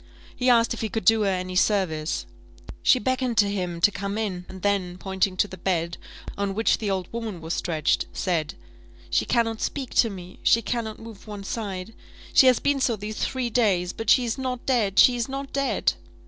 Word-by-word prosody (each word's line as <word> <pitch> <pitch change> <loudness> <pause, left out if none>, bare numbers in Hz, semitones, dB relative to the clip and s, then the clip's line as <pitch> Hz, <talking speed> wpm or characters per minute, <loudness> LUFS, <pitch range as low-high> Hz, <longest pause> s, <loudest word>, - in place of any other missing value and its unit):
He 250 0 +1
asked 235 -1 +4
if 235 - -6
he 220 - -2
could 220 -2 -3
do 225 +1 +5
her 200 - +2
any 185 -1 -2
service. 180 -6 +1 0.6
She - - +5
beckoned 255 0 -1
to 205 - +5
him 180 -4 -3
to 205 - +5
come 200 +1 -4
in, 185 -5 -3
and 190 -1 -10
then, 190 -3 0
pointing 190 0 -1
to 205 - +2
the 185 -2 -10
bed, 170 -2 -1 0.4
on 200 -1 -2
which 225 +2 +2
the 215 - -2
old 190 -2 -1
woman 225 -6 -4
was 165 +1 -4
stretched, 155 -3 0
said 170 -5 -2 0.6
"She - - +2
cannot 225 -2 0
speak 270 -4 -3
to 230 - +4
me 185 -3 -10
she 230 - +4
cannot 225 -2 -3
move 225 -2 -12
one 205 -2 -7
side 195 -1 -5 0.4
she 265 - +7
has 255 -2 +5
been 285 -1 +1
so 245 -3 +1
these 210 +1 -6
three 255 -2 -2
days 190 -7 +2
but 225 -1 -4
she 250 - +5
is 230 +3 -2
not 255 -2 -3
dead 215 -7 +1
she 250 - +7
is 240 +1 -2
not 275 +1 -5
dead!" 275 0 +1
205 Hz, 205 wpm, -25 LUFS, 185-235 Hz, 0.6 s, she